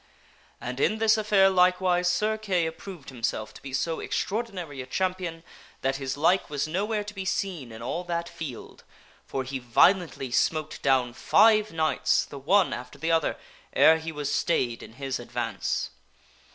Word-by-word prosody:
And 125 Hz, +2 st, -5 dB
in 215 Hz, -, +2 dB
this 220 Hz, 0 st, +4 dB
affair 210 Hz, -3 st, +4 dB
likewise 180 Hz, -1 st, +3 dB
Sir 210 Hz, +5 st, +1 dB
Kay 195 Hz, -6 st, 0 dB
approved 160 Hz, -1 st, -7 dB
himself 115 Hz, -4 st, -3 dB
to -, -, -13 dB
be 135 Hz, -, -8 dB
so 160 Hz, +5 st, -1 dB
extraor 220 Hz, +4 st, -1 dB
dinary 175 Hz, -, -7 dB
a 130 Hz, -, -9 dB
champion 180 Hz, 0 st, -2 dB, 0.4 s
that 135 Hz, 0 st, 0 dB
his 135 Hz, 0 st, -4 dB
like 175 Hz, +6 st, +2 dB
was 145 Hz, 0 st, -2 dB
nowhere 210 Hz, +6 st, -1 dB
to 210 Hz, 0 st, -8 dB
be 195 Hz, -2 st, -5 dB
seen 180 Hz, -, -3 dB
in 110 Hz, +1 st, -9 dB
all 170 Hz, +8 st, -3 dB
that 170 Hz, -1 st, -2 dB
field; 145 Hz, -9 st, -8 dB, 0.4 s
for 135 Hz, -, -2 dB
he 130 Hz, +1 st, -4 dB
violently 135 Hz, -, +2 dB
smote 155 Hz, +4 st, 0 dB
down 130 Hz, -3 st, +2 dB
five 215 Hz, -, +4 dB
knights, 160 Hz, -1 st, +1 dB
the 140 Hz, -, -9 dB
one 185 Hz, +7 st, +3 dB
after 125 Hz, +1 st, -7 dB
the 165 Hz, +1 st, -1 dB
other, 165 Hz, -2 st, +1 dB, 0.4 s
ere 160 Hz, +1 st, +6 dB
he 160 Hz, 0 st, -5 dB
was 145 Hz, -2 st, -3 dB
stayed 125 Hz, -8 st, 0 dB
in -, -, -11 dB
his 135 Hz, +1 st, -4 dB
advance. 120 Hz, -3 st, -3 dB
160 Hz, 170 wpm, -27 LUFS, 135-190 Hz, 0.4 s, ere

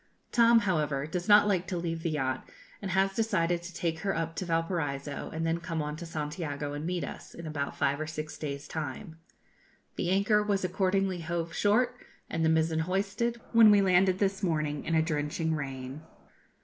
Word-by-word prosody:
Tom, 235 Hz, -1 st, +6 dB
however, 150 Hz, -8 st, 0 dB
does 175 Hz, +3 st, -4 dB
not 210 Hz, 0 st, +7 dB
like 190 Hz, -3 st, +1 dB
to 185 Hz, -, -2 dB
leave 165 Hz, -1 st, -3 dB
the 165 Hz, -, -1 dB
yacht, 130 Hz, -4 st, -2 dB, 0.3 s
and 200 Hz, -, -4 dB
has 190 Hz, +1 st, +2 dB
decided 175 Hz, -6 st, +1 dB
to 175 Hz, +2 st, -8 dB
take 165 Hz, -2 st, -2 dB
her 195 Hz, +2 st, -1 dB
up 165 Hz, 0 st, -2 dB
to 185 Hz, -, -3 dB
Valparaiso, 165 Hz, -4 st, -2 dB
and 160 Hz, +1 st, -3 dB
then 165 Hz, +1 st, 0 dB
come 165 Hz, -1 st, -4 dB
on 150 Hz, 0 st, -2 dB
to 170 Hz, -, -7 dB
Santiago 150 Hz, -2 st, -4 dB
and 145 Hz, +2 st, -4 dB
meet 180 Hz, -1 st, -1 dB
us, -, -, -8 dB
in 170 Hz, -, -8 dB
about 145 Hz, -3 st, -3 dB
five 140 Hz, +1 st, +1 dB
or 155 Hz, -, -3 dB
six 155 Hz, 0 st, -5 dB
days' 140 Hz, -1 st, -5 dB
time. 160 Hz, +3 st, -5 dB, 0.8 s
The 175 Hz, -, -1 dB
anchor 200 Hz, +3 st, +3 dB
was 200 Hz, -2 st, 0 dB
accordingly 190 Hz, 0 st, +1 dB
hove 170 Hz, 0 st, -3 dB
short, 240 Hz, +5 st, +2 dB, 0.4 s
and 165 Hz, -, 0 dB
the 160 Hz, -, +4 dB
mizen 160 Hz, 0 st, +2 dB
hoisted, 200 Hz, +7 st, -1 dB
when 230 Hz, -2 st, +8 dB
we 205 Hz, -1 st, +7 dB
landed 185 Hz, 0 st, +4 dB
this 195 Hz, 0 st, 0 dB
morning, 155 Hz, -5 st, -1 dB
in 165 Hz, -, 0 dB
a 160 Hz, -, +4 dB
drenching 160 Hz, +1 st, -1 dB
rain. 135 Hz, -1 st, -5 dB
165 Hz, 190 wpm, -29 LUFS, 155-190 Hz, 0.8 s, when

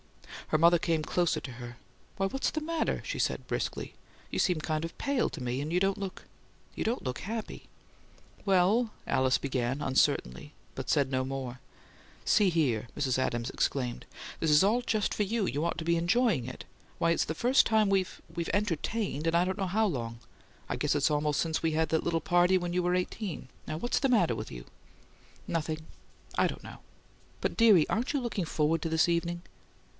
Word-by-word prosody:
Her 155 Hz, -, +2 dB
mother 170 Hz, +2 st, +5 dB
came 165 Hz, -2 st, 0 dB
closer 175 Hz, +2 st, +1 dB
to 130 Hz, -, -8 dB
her. 120 Hz, -1 st, -9 dB, 0.4 s
"Why, 195 Hz, -, +1 dB
what's 270 Hz, +8 st, 0 dB
the 310 Hz, -, -2 dB
matter?" 320 Hz, +1 st, -1 dB
she -, -, -3 dB
asked, -, -, -1 dB
briskly. -, -, -3 dB, 0.4 s
"You -, -, -1 dB
seem 180 Hz, -5 st, +2 dB
kind 155 Hz, 0 st, -2 dB
of 165 Hz, -, -6 dB
pale, 280 Hz, -3 st, 0 dB
to -, -, -8 dB
me; 125 Hz, +2 st, -2 dB
and 150 Hz, +2 st, -4 dB
you 180 Hz, -, +2 dB
don't 195 Hz, +1 st, +1 dB
look 195 Hz, -2 st, -6 dB, 0.5 s
you -, -, -2 dB
don't 235 Hz, +3 st, -1 dB
look 125 Hz, -1 st, -3 dB
HAPPY." 220 Hz, +2 st, -6 dB, 0.7 s
"Well 200 Hz, +4 st, +3 dB
" -, -, -29 dB
Alice 130 Hz, 0 st, +3 dB
began, 130 Hz, 0 st, -2 dB
uncertainly, 130 Hz, -, +1 dB, 0.2 s
but -, -, -5 dB
said 140 Hz, -2 st, +3 dB
no 130 Hz, -1 st, 0 dB
more. 130 Hz, -2 st, -5 dB, 0.6 s
"See 205 Hz, -3 st, +4 dB
here!" 130 Hz, -10 st, 0 dB
Mrs. 130 Hz, -3 st, +1 dB
Adams 120 Hz, -2 st, -1 dB
exclaimed. 125 Hz, -3 st, -1 dB, 0.4 s
"This 160 Hz, -, +2 dB
is 150 Hz, +3 st, +6 dB
all 220 Hz, +5 st, +3 dB
just 215 Hz, -4 st, 0 dB
for 210 Hz, -, +1 dB
you! 215 Hz, +1 st, 0 dB
You 145 Hz, -1 st, -1 dB
ought 170 Hz, -, -1 dB
to 160 Hz, -, -4 dB
be 170 Hz, 0 st, +3 dB
ENJOYING 175 Hz, -, +2 dB
it. 130 Hz, -, -8 dB, 0.3 s
Why, 165 Hz, -, +2 dB
it's 170 Hz, -, +2 dB
the 160 Hz, -, -3 dB
first 250 Hz, -, +4 dB
time 220 Hz, -1 st, +3 dB
we've 190 Hz, -2 st, 0 dB
we've 170 Hz, -1 st, -3 dB
entertained 200 Hz, -4 st, -1 dB
in 165 Hz, -, +2 dB
I 175 Hz, +1 st, +4 dB
don't 190 Hz, 0 st, -2 dB
know 190 Hz, -, 0 dB
how 215 Hz, +5 st, +2 dB
long! 115 Hz, -, -3 dB, 0.5 s
I -, -, -2 dB
guess 150 Hz, 0 st, 0 dB
it's 145 Hz, +1 st, +2 dB
almost 150 Hz, 0 st, +1 dB
since 160 Hz, -1 st, -1 dB
we 165 Hz, -, +2 dB
had 160 Hz, 0 st, +1 dB
that 160 Hz, 0 st, +1 dB
little 165 Hz, -1 st, +1 dB
party 175 Hz, +1 st, +4 dB
when 175 Hz, -1 st, -3 dB
you 180 Hz, 0 st, +1 dB
were 180 Hz, +1 st, +2 dB
eighteen. 180 Hz, -, -3 dB, 0.2 s
What's 160 Hz, +10 st, -1 dB
the 270 Hz, -, +1 dB
matter 210 Hz, -9 st, +3 dB
with -, -, -6 dB
you?" -, -, -8 dB, 0.8 s
"Nothing. 155 Hz, -1 st, -2 dB, 0.5 s
I -, -, +4 dB
don't -, -, -6 dB
know." -, -, -10 dB, 0.6 s
"But, -, -, -1 dB
dearie, 210 Hz, -9 st, +6 dB
aren't 235 Hz, +4 st, 0 dB
you 290 Hz, -, 0 dB
looking 230 Hz, -7 st, -2 dB
FORWARD 160 Hz, +1 st, +1 dB
to 165 Hz, -, -2 dB
this 160 Hz, +1 st, +3 dB
evening?" 170 Hz, 0 st, -1 dB
170 Hz, 200 wpm, -30 LUFS, 145-195 Hz, 0.8 s, is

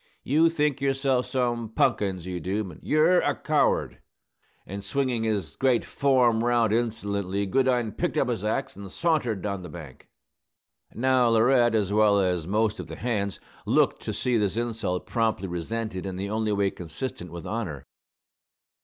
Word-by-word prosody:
You 160 Hz, +5 st, +4 dB
think 150 Hz, -4 st, 0 dB
yourself 135 Hz, -2 st, +1 dB
some 120 Hz, -3 st, -1 dB
punkins, 95 Hz, -5 st, 0 dB
you 90 Hz, -1 st, -4 dB
do; 95 Hz, +6 st, -2 dB
but 95 Hz, -, -11 dB
ye're 160 Hz, +4 st, +4 dB
a -, -, 0 dB
coward!" -, -, 0 dB, 0.6 s
And, 100 Hz, +1 st, -7 dB
swinging 125 Hz, +1 st, -1 dB
his 100 Hz, -8 st, -2 dB
great 130 Hz, -3 st, +2 dB
form 125 Hz, -5 st, +2 dB
round 120 Hz, -2 st, +2 dB
insolently, 100 Hz, -4 st, -1 dB
Goodine 125 Hz, +1 st, +1 dB
picked -, -, -2 dB
up -, -, +2 dB
his -, -, -2 dB
axe -, -, -2 dB
and 100 Hz, -1 st, -9 dB
sauntered 125 Hz, -, 0 dB
down 100 Hz, -2 st, -3 dB
the 90 Hz, -, -8 dB
bank. 75 Hz, -4 st, -11 dB, 0.9 s
Now, 130 Hz, 0 st, +3 dB
Laurette, 120 Hz, +1 st, +4 dB
as 100 Hz, -2 st, +1 dB
well 105 Hz, -1 st, +4 dB
as 90 Hz, -4 st, 0 dB
most 105 Hz, +2 st, +1 dB
of -, -, -6 dB
the -, -, -7 dB
hands, 100 Hz, -5 st, -2 dB, 0.3 s
looked -, -, +2 dB
to -, -, -4 dB
see 125 Hz, -2 st, 0 dB
this 105 Hz, -1 st, 0 dB
insult 115 Hz, -6 st, -2 dB
promptly 110 Hz, -5 st, 0 dB
resented 95 Hz, +3 st, -4 dB
in 95 Hz, -, -4 dB
the 100 Hz, +2 st, -4 dB
only 110 Hz, 0 st, 0 dB
way 100 Hz, -1 st, +1 dB
consistent 90 Hz, -, -6 dB
with 85 Hz, -1 st, -8 dB
honor. 105 Hz, -, -4 dB
110 Hz, 160 wpm, -26 LUFS, 95-125 Hz, 0.9 s, You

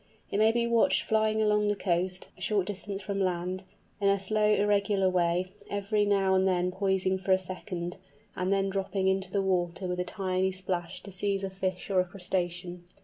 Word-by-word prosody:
It 200 Hz, -, 0 dB
may 220 Hz, +1 st, +5 dB
be 235 Hz, 0 st, +1 dB
watched 235 Hz, -1 st, +3 dB
flying 220 Hz, 0 st, +2 dB
along 210 Hz, 0 st, +3 dB
the 205 Hz, -, +2 dB
coast, 180 Hz, -1 st, -1 dB
a -, -, -16 dB
short 195 Hz, 0 st, +1 dB
distance 200 Hz, 0 st, -5 dB
from 200 Hz, 0 st, -3 dB
land, 185 Hz, 0 st, -1 dB, 0.4 s
in 200 Hz, -1 st, +3 dB
a 200 Hz, 0 st, +3 dB
slow 210 Hz, +2 st, +2 dB
irregular 200 Hz, -1 st, +2 dB
way, 180 Hz, 0 st, +1 dB, 0.2 s
every 205 Hz, +1 st, 0 dB
now 195 Hz, -2 st, +2 dB
and 190 Hz, 0 st, +3 dB
then 180 Hz, -1 st, +1 dB
poising 190 Hz, 0 st, 0 dB
for 190 Hz, +1 st, -2 dB
a 185 Hz, -, +7 dB
second, 180 Hz, -1 st, -5 dB, 0.4 s
and 185 Hz, +1 st, -1 dB
then 195 Hz, 0 st, +2 dB
dropping 195 Hz, 0 st, -1 dB
into 190 Hz, -1 st, +1 dB
the 195 Hz, +1 st, 0 dB
water 180 Hz, -1 st, 0 dB
with 180 Hz, 0 st, -2 dB
a -, -, +1 dB
tiny 185 Hz, 0 st, -1 dB
splash 180 Hz, -2 st, -3 dB
to 200 Hz, -, -9 dB
seize 195 Hz, +1 st, 0 dB
a 195 Hz, -, -3 dB
fish 185 Hz, 0 st, -3 dB
or 190 Hz, -, +3 dB
a 180 Hz, -, +3 dB
crustacean. 180 Hz, -1 st, -3 dB
190 Hz, 200 wpm, -29 LUFS, 185-200 Hz, 0.4 s, a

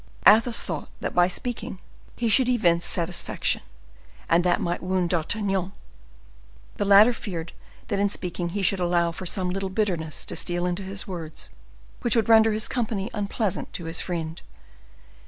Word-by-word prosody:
Athos 225 Hz, +3 st, +6 dB
thought 160 Hz, -4 st, -5 dB
that -, -, -3 dB
by 175 Hz, 0 st, +4 dB
speaking 205 Hz, +2 st, -4 dB, 0.4 s
he 240 Hz, -, -1 dB
should 250 Hz, +3 st, +4 dB
evince 175 Hz, -9 st, +2 dB
satisfaction, 175 Hz, 0 st, -1 dB, 0.7 s
and 170 Hz, +1 st, +3 dB
that 175 Hz, -1 st, +2 dB
might 175 Hz, 0 st, -2 dB
wound 180 Hz, -1 st, 0 dB
D'Artagnan. 195 Hz, +2 st, -1 dB, 1.0 s
The 205 Hz, -, 0 dB
latter 205 Hz, +4 st, +7 dB
feared 175 Hz, -8 st, -6 dB, 0.4 s
that 200 Hz, -, 0 dB
in 205 Hz, 0 st, +2 dB
speaking 175 Hz, -2 st, -3 dB
he 200 Hz, +3 st, -3 dB
should 190 Hz, +1 st, +3 dB
allow 175 Hz, -1 st, +2 dB
some 180 Hz, +1 st, -2 dB
little 195 Hz, +1 st, -3 dB
bitterness 185 Hz, -6 st, -2 dB
to -, -, -5 dB
steal 175 Hz, 0 st, -1 dB
into 180 Hz, +2 st, -2 dB
his 195 Hz, +2 st, -5 dB
words 165 Hz, -4 st, -6 dB, 0.5 s
which 240 Hz, -, +5 dB
would 230 Hz, 0 st, +2 dB
render 220 Hz, 0 st, +6 dB
his 215 Hz, 0 st, 0 dB
company 220 Hz, -4 st, -2 dB
unpleasant 205 Hz, -1 st, -2 dB
to 170 Hz, -, -5 dB
his 165 Hz, 0 st, -1 dB
friend. 165 Hz, -2 st, -4 dB
190 Hz, 155 wpm, -25 LUFS, 175-210 Hz, 1.0 s, latter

